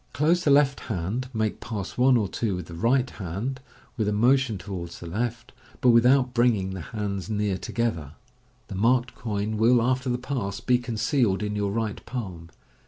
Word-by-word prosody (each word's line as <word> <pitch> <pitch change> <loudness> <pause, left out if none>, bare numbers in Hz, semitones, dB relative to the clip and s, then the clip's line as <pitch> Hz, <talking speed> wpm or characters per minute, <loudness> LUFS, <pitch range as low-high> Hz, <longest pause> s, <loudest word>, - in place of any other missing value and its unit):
Close 160 +7 +2
the 150 - +2
left 140 -1 +4
hand, 110 +6 -2
make 110 -3 -1
Pass 105 -4 -5
1 125 0 +5
or 105 -3 0
2 100 0 -2
with 90 -2 -5
the 85 - -10
right 120 +9 +2
hand, 105 +8 -5 0.4
with 110 -3 0
a - - +1
motion 120 +1 +3
towards 90 -3 -7
the - - -9
left, 110 +6 -3 0.3
but 125 - +4
without 125 +2 +4
bringing 115 -6 +2
the 95 -2 -5
hands 100 0 -4
near 105 -2 0
together. 90 -8 -2 0.5
The - - -7
marked 120 +5 +2
coin 105 -2 -3
will, 120 +3 +5
after 130 +2 0
the 125 - +1
pass, 125 -6 -3
be 125 -1 +2
concealed 120 -3 0
in 105 0 -2
your 100 -1 -1
right 110 -1 -3
palm. 95 -9 -6
110 Hz, 180 wpm, -26 LUFS, 100-125 Hz, 0.5 s, 1